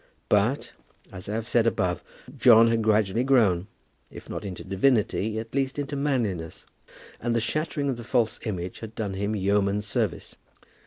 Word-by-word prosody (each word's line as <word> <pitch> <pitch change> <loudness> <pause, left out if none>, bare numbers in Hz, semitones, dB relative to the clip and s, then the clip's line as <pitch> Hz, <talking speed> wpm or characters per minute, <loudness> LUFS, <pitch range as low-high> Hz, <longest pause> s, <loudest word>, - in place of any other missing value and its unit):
But, - - +1 0.4
as 95 +2 -8
I 105 - -2
have 115 0 -3
said 120 -2 +3
above, 90 -6 0 0.3
John 115 -2 +7
had 115 0 +1
gradually 110 +1 +2
grown, 105 -9 +3 0.4
if - - -11
not - - -5
into 95 -3 -6
divinity, 110 +1 +1
at 115 +1 -6
least 135 0 -1
into 145 0 -3
manliness; 115 - -2 0.5
and 120 0 -1
the - - +3
shattering 145 +5 -2
of 130 -3 -1
the 120 - -8
false 115 -1 0
image 90 -4 -4
had 110 -1 -9
done 105 -3 -3
him 100 +3 -2
yeoman's 100 +1 +1
service. 100 - -2
110 Hz, 165 wpm, -26 LUFS, 100-120 Hz, 0.5 s, John